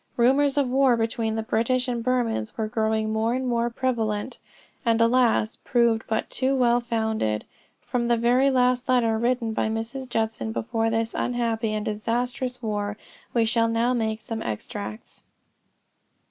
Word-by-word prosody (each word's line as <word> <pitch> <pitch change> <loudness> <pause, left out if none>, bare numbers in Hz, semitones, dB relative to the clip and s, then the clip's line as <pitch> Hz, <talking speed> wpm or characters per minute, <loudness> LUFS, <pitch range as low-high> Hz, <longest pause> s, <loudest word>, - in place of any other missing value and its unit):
Rumors 270 +4 +3
of 285 - +3
a - - -4
war 260 -2 +4
between 225 -1 -1
the 225 - -2
British 250 +3 +1
and 240 -2 -2
Burmans 235 - -1
were 220 - -1
growing 220 0 0
more 225 +2 +1
and 260 0 -2
more 235 -1 +1
prevalent, 235 -2 -2 0.4
and 230 -1 +2
alas, 230 -1 +3
proved 235 -2 +2
but 220 0 -1
too 265 +1 +1
well 240 -2 +3
founded. 220 - -1 0.4
From 240 -1 -1
the 240 -1 +3
very 245 +4 +3
last 250 -1 +2
letter 230 -3 +3
written 235 -1 0
by 220 - 0
Mrs. 230 +4 -4
Judson 220 -1 -1
before 225 0 -1
this 225 0 -1
most - - -1
unhappy 230 -2 -1
and 215 0 -2
disastrous 245 +3 -2
war, 205 -1 -2 0.4
we 230 -1 +4
shall 230 0 +2
now 230 +2 +1
make 220 -2 -1
some 225 +1 -5
extracts. 205 - -6
230 Hz, 160 wpm, -25 LUFS, 220-250 Hz, 0.4 s, war